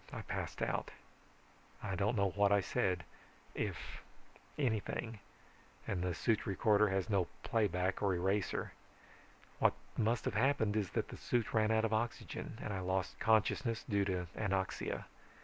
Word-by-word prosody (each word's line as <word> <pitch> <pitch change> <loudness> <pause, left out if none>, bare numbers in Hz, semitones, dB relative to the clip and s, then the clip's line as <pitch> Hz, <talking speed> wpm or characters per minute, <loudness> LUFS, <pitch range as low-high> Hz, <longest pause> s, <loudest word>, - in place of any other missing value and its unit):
I - - -5
passed - - -3
out. - - -1 0.9
I 100 -2 -2
don't 100 +5 +1
know 100 -2 +2
what 100 +1 +3
I 100 - +6
said, 95 -3 0 0.5
if - - -4 0.6
anything, 110 -3 -1 0.7
and 90 - -1
the 90 -1 -1
suit 110 +3 +1
recorder 105 +2 +4
has 95 -1 0
no 100 -5 +2 0.2
playback 95 -4 +1
or 100 -3 +2
eraser. 95 +3 0 0.9
What - - +5 0.2
must 115 +2 +1
have - - 0
happened 110 -2 +2
is 105 -4 +1
that - - -1
the - - -7
suit 120 -3 0
ran 110 -1 +3
out 110 0 +3
of 110 - 0
oxygen, 115 0 -2
and 105 - -3
I 95 - -2
lost 95 0 -1
consciousness 110 +2 +2
due 100 -4 +2
to 90 -2 -1
anoxia. 95 -3 -1
105 Hz, 150 wpm, -36 LUFS, 95-110 Hz, 0.9 s, I